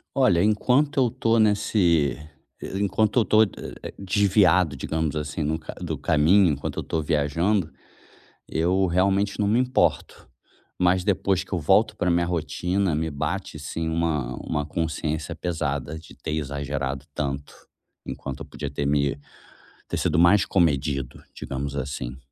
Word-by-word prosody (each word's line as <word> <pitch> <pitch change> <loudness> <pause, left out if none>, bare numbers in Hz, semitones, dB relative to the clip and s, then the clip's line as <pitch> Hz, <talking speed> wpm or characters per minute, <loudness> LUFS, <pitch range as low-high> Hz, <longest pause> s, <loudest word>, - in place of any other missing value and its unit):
Olha, 105 -11 +4
enquanto 130 +7 +2
eu 125 -3 +3
tô 115 +1 +1
nesse 100 -8 +2 0.6
enquanto 105 +3 +1
eu - - +2
tô 110 +1 +5
eh - - -3 0.4
eh, - - -7
desviado, 95 -5 +3
digamos 80 +2 -2
assim 75 +1 -3
no 80 +2 -1
ca 80 - -9
do 85 -3 -3
caminho, 80 +5 +4
enquanto 70 -1 -4
eu - - -1
tô 80 - -2
viajando, 80 +5 0 0.8
eu 90 +4 +1
realmente 95 +3 +1
não - - +2
me 110 +4 +3
importo, 130 0 0 0.5
mas 90 +1 +3
depois 95 -1 +1
que - - -9
eu 90 - 0
volto 75 - +3
pra 90 - 0
minha 85 0 +2
rotina, 90 +2 -1
me 80 +1 -1
bate, 80 +5 -3
assim, 80 +2 -4
uma 80 -7 -1
uma 75 -1 -3
consciência 80 -1 -3
pesada 75 -3 -3
de 80 - -15
ter - - -6
exagerado 70 -2 -3
tanto, 70 -1 -4 0.5
enquanto 70 -2 -6
eu - - -7
podia 75 - -6
ter 70 0 -3
me 70 0 +1 0.7
ter - - -3
sido 80 - +1
mais 90 +4 +6
comedido, 70 -7 0
digamos 70 +1 -5
assim. 65 -2 -4
80 Hz, 150 wpm, -24 LUFS, 75-95 Hz, 0.8 s, mais